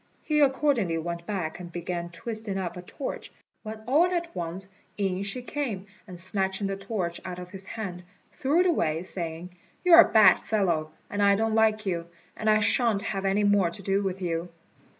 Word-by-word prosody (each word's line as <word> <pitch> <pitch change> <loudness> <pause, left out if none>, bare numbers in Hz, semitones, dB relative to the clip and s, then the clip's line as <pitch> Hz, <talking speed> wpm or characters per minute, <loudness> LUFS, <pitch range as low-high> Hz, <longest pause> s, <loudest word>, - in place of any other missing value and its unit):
He 300 -1 +1
accordingly 265 - +2
went 170 +1 -4
back, 180 -6 -3
and 175 -1 -8
began 170 0 -4
twisting 215 +3 -4
up 180 -2 -3
a 180 - -6
torch, 255 +9 -6 0.3
when 220 0 -7
all 290 +8 +4
at 345 -2 -3
once 175 +3 -5 0.3
in 195 -2 0
she 200 +5 -3
came, 245 -9 -3 0.2
and 180 -2 -9
snatching 190 +2 -1
the 195 0 -1
torch 195 -4 -3
out 180 -1 -6
of 180 0 -8
his 195 -1 -7
hand, 195 -5 -5 0.3
threw 295 +6 +2
it - - +2
away, 165 - +1
saying, 170 -1 -5 0.3
"You're 340 -2 +9
a - - +2
bad 215 -2 +7
fellow, 175 -8 0 0.2
and 205 - -2
I 200 0 +5
don't 220 +1 0
like 220 -1 +3
you, 170 -3 -2 0.3
and 220 - 0
I 215 - +6
shan't 215 -1 +2
have 195 -3 -3
any 195 +2 +2
more 205 -3 +4
to 195 +3 -5
do 195 +1 +1
with 190 -1 -3
you." 170 0 -2
195 Hz, 190 wpm, -27 LUFS, 175-220 Hz, 0.3 s, You're